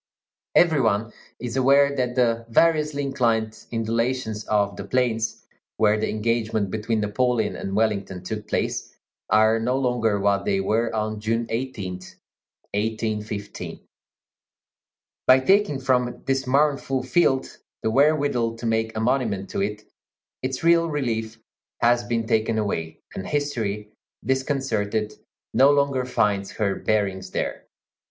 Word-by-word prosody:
Every 160 -5 +5
one 110 0 0 0.2
is 120 0 -5
aware 140 +2 +4
that 125 -2 -1
the 115 -2 +1
variously 150 +1 +2
inclined 115 -5 0
undulations 115 -1 -1
of 100 -2 +1
the - - -6
plains, 115 0 -1 0.3
where 105 0 +3
the 110 - -1
engagement 110 -2 -1
between 110 0 -1
Napoleon 110 +1 0
and 95 - -4
Wellington 100 -4 0
took 105 +2 -5
place, - - -2 0.3
are 110 +2 +4
no 125 +3 0
longer 120 -5 +1
what 100 0 +2
they 95 - +1
were 110 +4 +1
on 110 0 -2
June 115 +2 -1
18, 115 -5 -3
1815. 105 +2 -5 1.5
By 130 0 +8
taking 190 0 +3
from 125 -2 0
this 135 -1 0
mournful 140 -1 +1
field 135 0 +1 0.2
the 110 - +1
wherewithal 140 -4 +2
to 115 - -8
make 110 -1 0
a - - 0
monument 110 -5 0
to - - -2
it, 105 +1 -3 0.6
its 130 +3 -3
real 170 0 +4
relief 115 -6 -2 0.4
has 120 0 +3
been 120 -1 -1
taken 110 0 +1
away, 80 -7 -2 0.2
and 95 - -6
history, 110 -8 -2 0.3
disconcerted, 115 -6 -1 0.4
no 135 +4 +6
longer 140 -3 +2
finds 100 -5 0
her 100 -2 0
bearings 95 -4 -1
there. - - -4
115 Hz, 130 wpm, -24 LUFS, 105-130 Hz, 1.5 s, By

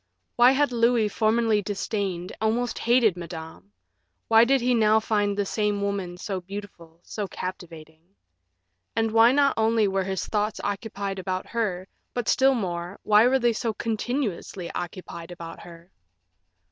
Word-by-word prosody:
Why 240 +1 +7
had 285 0 +2
Louis 230 -2 +2
formerly 220 0 +2
disdained, 195 -3 -3
almost 235 +3 0
hated, 235 -5 +3
Madame? 160 - -9 0.6
Why 225 +1 +7
did 270 +2 +3
he 250 +1 +1
now 220 -1 +4
find 205 -2 0
the 205 - 0
same 210 0 -1
woman 195 -3 -3
so 190 0 -4
beautiful, 180 -4 -10
so 210 -2 -5
captivating? 165 -4 -8 0.9
And 225 -1 +1
why, 225 +2 +6
not 280 0 +3
only 220 -1 +3
were 195 -1 -1
his 190 -1 -2
thoughts 210 0 -1
occupied 200 -1 -4
about 185 0 -3
her, 195 -6 -2 0.3
but 245 -3 -2
still 265 0 +4
more, 175 -3 -4
why 215 +2 +5
were 265 +1 +3
they 240 -2 +2
so 225 0 -2
continuously 220 -6 -3
occupied 175 -1 -7
about 170 -2 -9
her? 170 +1 -14
205 Hz, 145 wpm, -25 LUFS, 180-230 Hz, 0.9 s, Why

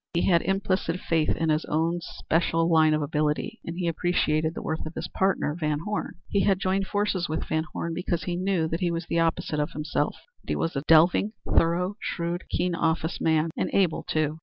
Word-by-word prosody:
He 170 - +2
had 170 -3 +4
implicit 190 -2 0
faith 160 -3 0
in 165 - 0
his 155 +1 +2
own 165 +3 0
special 165 0 0
line 160 -2 +4
of 155 - -1
ability, 150 +10 -1
and 170 +1 -6
he 180 -2 -1
appreciated 160 -2 +1
the - - -4
worth 160 0 -2
of 155 - -9
his 160 - -4
partner, 190 -6 0
VanHorne. 160 +5 -2
He 200 - +1
had 195 -2 +3
joined 190 0 0
forces 205 -4 0
with 155 - -1
VanHorne 165 +1 -3
because 175 -1 -2
he 175 - -2
knew 180 -2 0
that 165 - -2
he 180 - +1
was 170 0 -3
the 170 - 0
opposite 165 -2 0
of 150 +3 -1
himself 150 0 -1 0.3
that - - -15
he - - +1
was 165 - -1
a 135 - 0
delving, 175 +6 +5 0.2
thorough, 180 +4 +2
shrewd, 170 0 -3
keen 180 +1 0
office 165 0 -1
man 160 0 +2
and - - -1
able 185 -5 +2
too. 155 0 -1
165 Hz, 205 wpm, -26 LUFS, 160-180 Hz, 0.3 s, delving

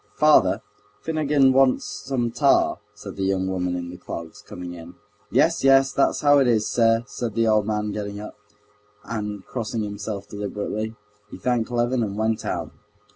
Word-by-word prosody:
"Father, 150 0 +4 0.4
Finogen 150 -4 +3
wants 130 -3 +3
some 120 +3 -3
tar," - - +3 0.2
said - - -9
the 95 - -2
young 95 -1 0
woman 90 -1 -1
in 85 -1 -5
the 90 - -9
clogs, 85 -2 -8
coming 90 -1 -8
in. 85 0 -11 0.3
"Yes, 155 +7 +2
yes, 135 0 +5
that's 140 - +1
how 145 -1 +5
it 135 - +3
is, 110 -3 +2
sir!" 115 -1 +3
said 110 +1 -5
the 115 -1 +2
old 110 -1 +3
man, 105 -1 -1
getting 100 -1 -5
up, 105 - -8 0.7
and 105 -3 -5
crossing 115 -2 -3
himself 105 0 -5
deliberately, 105 +2 -4 0.3
he - - -9
thanked 120 -2 0
Levin 120 +1 0
and 105 -2 -3
went 110 0 0
out. - - -3
110 Hz, 170 wpm, -23 LUFS, 100-125 Hz, 0.7 s, yes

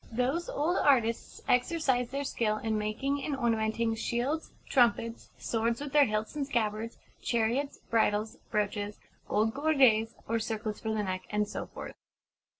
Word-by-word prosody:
Those 255 +9 0
old 320 +6 +1
artists 235 -5 +2
exercised 250 -2 +2
their 280 +1 -2
skill 220 -5 0
in 220 0 -1
making 265 +7 -1
and 290 - -1
ornamenting 225 -1 +1
shields; 245 +7 -1 0.2
trumpets; 235 -3 +2
swords 230 0 0
with 290 -1 -6
their 295 -1 +7
hilts 215 +3 -2
and 285 -2 -2
scabbards; 225 -3 -1 0.2
chariots; 240 +5 0
bridles; 215 -1 0
brooches; 205 0 -1 0.3
gold 220 +1 +2
gorgets 260 -7 +4
or 230 +1 +1
circlets 215 -1 -3
for 220 - -4
the 215 -1 0
neck; 185 -1 -3
and 210 0 0
so - - -5
forth. - - -8
230 Hz, 150 wpm, -30 LUFS, 215-270 Hz, 0.3 s, their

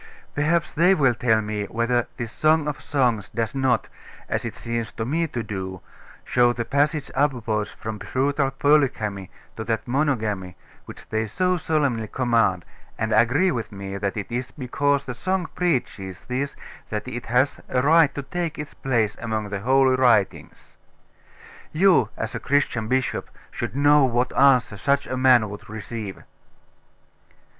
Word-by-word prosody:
Perhaps 155 +3 +1
they 180 +4 +4
will 135 -6 +3
tell 115 -1 +2
me 105 -1 -3
whether 115 +3 0
this 115 -2 -4
Song 155 +3 +2
of 150 - -4
Songs 120 -8 0
does 115 -1 -2
not, 130 -4 +1 0.4
as - - -2
it - - -5
seems 115 -1 -3
to 110 - -4
me 165 +6 0
to 120 -6 -4
do, 95 -3 -5 0.5
show 120 -1 +3
the 115 -1 -3
passage 145 +3 0
upwards 115 -7 0
from 110 -1 -6
brutal 135 +3 0
polygamy 135 -9 +1 0.3
to 110 - -5
that 115 0 -2
monogamy 110 - -1 0.3
which - - -12
they 110 0 -1
so 180 - +1
solemnly 145 -9 0
command, 115 -7 +1 0.3
and 110 0 -1
agree 125 - +3
with 115 -4 -4
me, 100 -1 -6
that 100 +1 -2
it 105 +2 -5
is 125 +2 -3
because 140 +1 -1
the 125 - -4
song 185 +7 -1
preaches 120 - -2
this 130 +3 -3 0.3
that 105 +3 -4
it 120 -1 -6
has 125 +4 +1
a 125 -1 +1
right 155 0 +5
to 145 - -4
take 170 +3 -3
its 150 -1 -6
place 115 -6 0
among 110 -2 -2
the 100 -1 -3
holy 130 +4 +3
writings? 120 -6 +1 0.9
You, 165 - +4
as 110 - -4
a - - -3
Christian 130 -5 0
bishop, 130 +1 -1 0.2
should - - -5
know 145 0 +5
what 125 0 0
answer 125 -6 +4
such 140 +6 +1
a - - -4
man 125 -3 +5
would 105 +2 -10
receive.... 105 -2 -6
125 Hz, 160 wpm, -23 LUFS, 110-140 Hz, 0.9 s, right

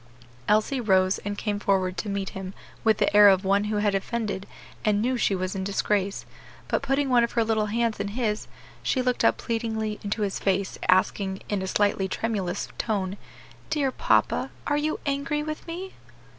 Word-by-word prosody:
Elsie 215 +5 +2
rose 190 -3 +3
and 205 0 -4
came 205 -1 -2
forward 190 -2 +1
to 210 - -4
meet 200 -1 -2
him 190 0 -7 0.3
with 220 -2 +4
the - - +1
air 205 0 +9
of 190 0 +3
one 200 +2 +3
who 210 0 -1
had 205 -1 +2
offended 200 -1 -2 0.4
and 210 -1 +2
knew 250 +4 +1
she 210 -4 +1
was 185 0 -2
in 190 -1 -3
disgrace; 200 0 -1 0.4
but - - 0
putting 275 +1 +1
one 245 -2 +4
of 235 - -1
her 230 - +3
little 220 -1 +1
hands 230 0 0
in 200 - -1
his, 215 0 -2 0.3
she 260 - 0
looked 250 -1 0
up - - +4
pleadingly 220 -2 -2
into 205 +1 -1
his 195 -1 -2
face, 195 0 0
asking, 190 +1 +2
in 205 -2 0
a 190 - -3
slightly 200 -1 +1
tremulous 200 -3 -2
tone, 195 -4 -1 0.5
"Dear 280 -3 +1
papa, - - +2 0.2
are 290 - +1
you 300 +1 0
angry 285 +1 -1
with 310 +2 -6
me?" 365 +3 -6
210 Hz, 185 wpm, -26 LUFS, 195-235 Hz, 0.5 s, air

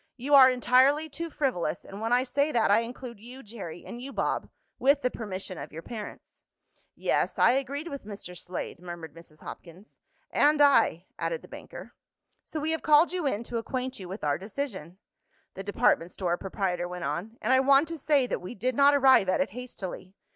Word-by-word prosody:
You 270 +4 -2
are 265 -2 +10
entirely 260 +5 +3
too 335 +3 -5
frivolous, 245 - -2
and 200 +2 -9
when 225 +1 -2
I 250 +1 +4
say 280 +4 0
that 230 -5 +2
I 205 - +6
include 235 -1 -7
you, 250 +5 -11
Jerry, 195 -7 -9
and 240 - -8
you, 270 +2 -7
Bob, - - -2 0.3
with 280 +2 +3
the 250 - +1
permission 190 -4 -6
of - - -8
your 165 +2 -8
parents." 220 -4 -9 0.5
"Yes, - - 0
I - - +6
agreed 275 +4 -2
with 280 -4 -6
Mr. 200 -4 -9
Slade," 180 0 -6
murmured 175 -3 -8
Mrs. 165 -2 -16
Hopkins. 180 +5 -12 0.3
"And 295 +1 +4
I," 280 - +4
added - - -2
the - - -12
banker. - - -10 0.5
"So 315 - -5
we 310 +2 -1
have 320 - -1
called 305 +3 +5
you 355 -5 -1
in 230 -4 -1
to 235 0 -3
acquaint 255 +2 -4
you 185 -2 -8
with 195 +4 -7
our 145 0 +1
decision," 195 - -5 0.6
the 195 - -7
department 195 -4 +1
store 175 -3 -1
proprietor 180 -2 -2
went 180 0 -6
on. 220 +7 -4
"And 245 +4 +1
I 260 - +6
want 275 +3 +5
to 330 - -5
say 280 -2 +3
that - - -3
we 185 +7 -7
did 250 +6 -1
not 280 +3 +5
arrive 265 -8 +5
at - - +2
it 275 - 0
hastily. 195 -6 -8
240 Hz, 200 wpm, -28 LUFS, 185-275 Hz, 0.6 s, are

